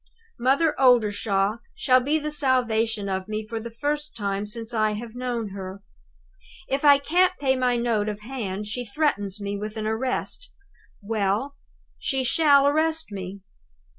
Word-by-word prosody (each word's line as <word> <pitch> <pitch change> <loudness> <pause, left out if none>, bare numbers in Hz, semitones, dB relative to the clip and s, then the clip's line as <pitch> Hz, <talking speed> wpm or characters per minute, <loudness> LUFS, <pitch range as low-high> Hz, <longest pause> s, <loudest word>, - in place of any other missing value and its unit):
Mother 275 +6 +3
Oldershaw 210 -4 +3 0.2
shall 255 -2 +4
be 285 +5 +1
the 300 0 -3
salvation 230 -7 +1
of 190 0 -2
me 215 0 -3
for 225 0 -4
the 235 +1 -7
first 295 +6 -3
time 200 -1 -2
since 225 +2 -4
I 215 -1 +2
have 225 +1 -6
known 245 -3 -3
her. 190 0 -8 0.8
If 275 +2 -1
I 285 -1 +8
can't 360 +6 +2
pay 265 -2 +2
my 250 -1 +1
note 230 -3 0
of 210 0 -6
hand, 210 -5 -4
she 225 +4 -3
threatens 210 -6 -1
me 200 0 -3
with 215 +1 -6
an 215 - -3
arrest. 255 - -2 0.5
Well, 215 +6 -1 0.4
she 265 -1 0
shall 280 +1 +5
arrest 315 0 +1
me. 195 0 -6
230 Hz, 155 wpm, -25 LUFS, 210-275 Hz, 0.8 s, I